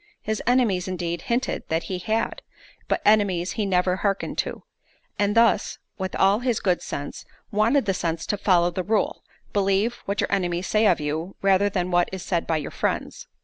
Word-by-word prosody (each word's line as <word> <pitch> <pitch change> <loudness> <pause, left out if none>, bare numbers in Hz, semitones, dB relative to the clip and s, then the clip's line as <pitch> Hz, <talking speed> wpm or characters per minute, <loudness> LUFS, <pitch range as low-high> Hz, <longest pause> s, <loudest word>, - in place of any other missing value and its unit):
his 220 0 -2
enemies, 230 -8 +2
indeed, 170 -2 -3
hinted 240 +6 -1
that 160 +1 0
he 185 -2 -4
had, 220 +4 -1 0.5
but - - -1
enemies 200 -4 +3
he 210 -3 -2
never 180 -1 +2
harkened 195 -1 -1
to; - - -3 0.6
and 205 +1 +1
thus, 230 -2 +3 0.2
with 190 -1 -3
all 195 +2 +4
his 245 -3 0
good 180 -3 +1
sense, 145 0 -6 0.3
wanted 225 +6 +3
the 195 - +1
sense 165 -3 -2
to - - 0
follow 175 -3 +3
the 185 - -2
rule, 215 +4 0 0.3
Believe 200 +4 +1
what 200 +1 -2
your - - 0
enemies 180 -2 0
say 215 0 +3
of 180 - +3
you, 155 +5 -3
rather 195 +1 +4
than 180 -2 -2
what 175 0 +3
is 190 -1 -5
said 170 -3 -1
by 160 - +1
your 150 - -5
friends. - - -3
190 Hz, 190 wpm, -24 LUFS, 175-210 Hz, 0.6 s, all